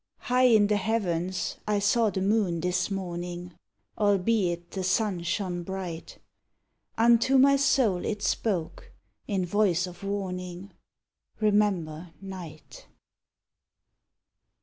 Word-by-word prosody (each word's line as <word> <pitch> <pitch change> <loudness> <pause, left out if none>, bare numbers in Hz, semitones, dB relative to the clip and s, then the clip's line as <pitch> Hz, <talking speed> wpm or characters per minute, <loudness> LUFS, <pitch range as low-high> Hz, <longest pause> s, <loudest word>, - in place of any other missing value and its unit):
High 250 +1 +2
in 220 -4 +5
the 210 0 +2
heavens 185 -5 -1
I 210 -1 +2
saw 215 +3 +2
the 190 -1 -2
moon 195 -4 +1
this 180 +3 0
morning, 175 -2 -5 0.5
Albeit 195 -4 +1
the 190 - -4
sun 185 0 0
shone 175 0 -2
bright; 180 -2 -6 0.8
Unto 235 +3 +4
my 275 +1 +6
soul 250 -9 +2
it 210 -1 -3
spoke, 190 -4 -2 0.3
in 190 -3 0
voice 180 -2 +2
of 180 +1 -11
warning, 185 -1 -4 0.7
"Remember 185 -6 0
Night!" 180 -6 -10
190 Hz, 105 wpm, -27 LUFS, 175-210 Hz, 0.8 s, my